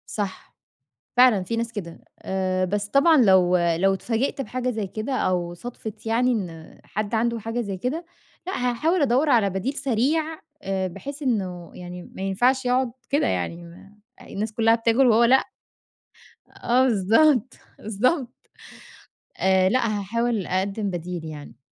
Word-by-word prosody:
صح، 200 -3 -5 0.6
فعلًا 245 -6 +6
في 230 +5 -3
ناس 230 0 -2
كده، 175 -7 -7 0.2
آآ 185 -1 -1
بس 205 +2 -2
طبعًا 280 +8 +5
لو 190 -7 +5
لو 175 +3 +2
اتفاجئت 235 +7 -2
بحاجة 255 +2 -3
زي 220 -4 -3
كده، 215 +7 -5
أو 175 -4 -1
صادفِت 220 +2 -8
يعني 245 +3 +2
إن 170 -8 -5
حد 210 +2 -4
عنده 230 +1 +1
حاجة 225 +2 -3
زي 200 -4 -4
كده، 265 - -3 0.4
لأ، 375 - -3 0.2
هاحاول 315 +8 +1
أدوّر 275 +3 +2
على 220 -6 +4
بديل 190 +9 -2
سريع 275 +4 +1 0.4
آآ 190 -1 -1
بحيث 280 - -8
إنّه 185 - -2
يعني 180 0 -8
ما 190 - -10
ينفعش 245 +8 +1
يقعد 250 -1 +1 0.2
كده، 285 - +2
يعني 95 - -2
م 180 +4 -15 0.2
الناس 215 +2 -5
كلّها 225 +1 +3
بتاكل 230 +3 +3
وهو 235 0 +5
لأ؟ 260 +3 +5 1.2
آه 250 +2 +3
بالضبط، 245 +3 +3 0.3
بالضبط. 245 - 0 1.0
آآ 190 0 +3
لأ 245 +3 +2
هاحاول 230 0 -1
أقَدمِّ 195 +2 -1
بديل 175 -1 -5
يعني. 150 -6 -9
220 Hz, 145 wpm, -24 LUFS, 185-250 Hz, 1.2 s, فعلًا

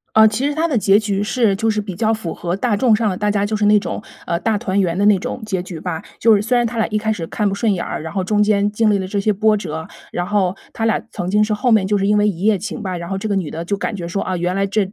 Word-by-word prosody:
呃， 220 0 +8
其 225 +6 -1
实 290 - -1
他 325 +2 +1
的 275 - 0
结 200 -2 +4
局 205 -2 -1
是 215 -2 +1
就 225 +2 +1
是 210 -1 0
比 200 -3 -6
较 220 +1 +1
符 185 -7 -4
合 175 0 -3
大 210 +1 0
众 235 +1 +4
上 220 0 +1
的， 185 - -2
大 210 +1 0
家 205 0 +1
就 215 +1 -1
是 210 - 0
那 210 0 +6
种， 205 - -5 0.2
呃， 170 - 0
大 220 0 0
团 195 0 -1
圆 180 -3 +1
的 205 +2 +2
那 205 -2 +5
种 220 - -5
结 190 -4 -2
局 175 -4 -8
吧。 165 -2 -4 0.2
就 225 -2 +5
是 200 - 0
虽 245 +3 +1
然 240 -1 +2
他 235 - -5
俩 225 - +2
一 215 -1 0
开 220 +1 -1
始 180 -6 -2
看 210 -2 0
不 195 - -1
顺 210 +1 +1
眼 175 - -2
儿， - - -4
然 160 0 -6
后 190 - -1
中 210 +2 +1
间 205 -1 +2
经 220 0 +2
历 200 - +2
了 190 - -3
这 200 +1 -2
些 210 +2 +2
波 210 +2 +2
折， 160 -5 -5 0.2
然 175 - -3
后 195 -2 +1 0.2
他 225 - -2
俩 225 -3 +2
曾 180 +1 -4
经 210 +1 +3
是 215 0 +1
后 235 +3 +1
面 200 -3 +4
就 205 - +1
是 195 0 0
因 210 0 +3
为 210 0 +3
一 180 -2 -4
夜 215 -1 +3
情 210 +4 -6
吧， 185 -3 -3
然 170 - -7
后 195 - -2
这 195 - -4
个 205 - 0
女 175 -6 -2
的 165 +1 -5
就 200 +4 -1
感 205 +2 -3
觉 175 -3 -5
说， 195 +3 -2
啊， 185 -1 -2
原 175 +1 -1
来 195 0 +1
这 200 -1 -1
205 Hz, 360 characters per minute, -19 LUFS, 190-215 Hz, 0.2 s, 呃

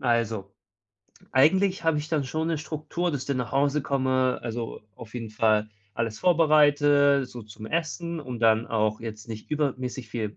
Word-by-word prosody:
also. 115 -6 0 0.8
Eigentlich 185 +7 +3
habe 160 -2 +3
ich 150 +1 -5
dann 150 -4 0
schon 160 +4 -2
'ne 160 -2 0
Struktur, 155 +3 -3
dass 145 -4 -3
ich - - -10
dann 140 -2 -1
nach 125 -3 -3
Hause 140 +1 +2
komme, 130 -2 +1
also, 115 -1 -5
auf 115 +2 -12
jeden 115 -3 -5
Fall 110 -1 +2 0.3
alles 115 -1 -2
vorbereite, 145 -4 +4
so 120 -2 -9
zum 110 +1 -10
Essen 170 +3 -2
und 125 -4 -7
dann 110 0 +4
auch 110 -1 0
jetzt 110 -1 -8
nicht 110 +4 -8
übermäßig 130 -5 -2
viel 110 -2 -4
130 Hz, 175 wpm, -26 LUFS, 115-150 Hz, 0.8 s, vorbereite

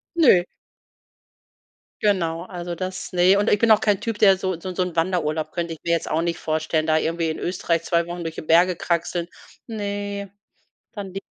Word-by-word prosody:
Ne. 240 - +5 1.6
Genau, 170 -6 +1
also 175 -2 -6
das, 185 +1 -5
ne, 180 +2 +5
und 205 - +2
ich 205 - +3
bin 230 -1 +4
auch 215 - +7
kein 205 -3 +1
Typ, 225 -2 -3
der 195 -3 +6
so 185 -3 -3
so 185 - -6
'n 180 - -6
so 185 - 0
'n 180 -2 -5
Wanderurlaub 165 -3 0
könnte 170 -2 -3
ich 160 - -11
mir 170 - 0
jetzt 170 - 0
auch 160 +2 +1
nicht 170 0 -1
vorstellen, 155 0 -1
da 155 0 +3
irgendwie 165 0 0
in 155 - -4
Österreich 170 -2 -1
2 170 -1 +1
Wochen 175 0 -5
durch 165 0 -5
die - - -5
Berge 175 +3 +4
kraxeln. 170 0 -1 0.4
Ne, 205 -2 -4 0.7
dann 195 -3 -6
die 195 - -4
175 Hz, 200 wpm, -23 LUFS, 165-195 Hz, 1.6 s, auch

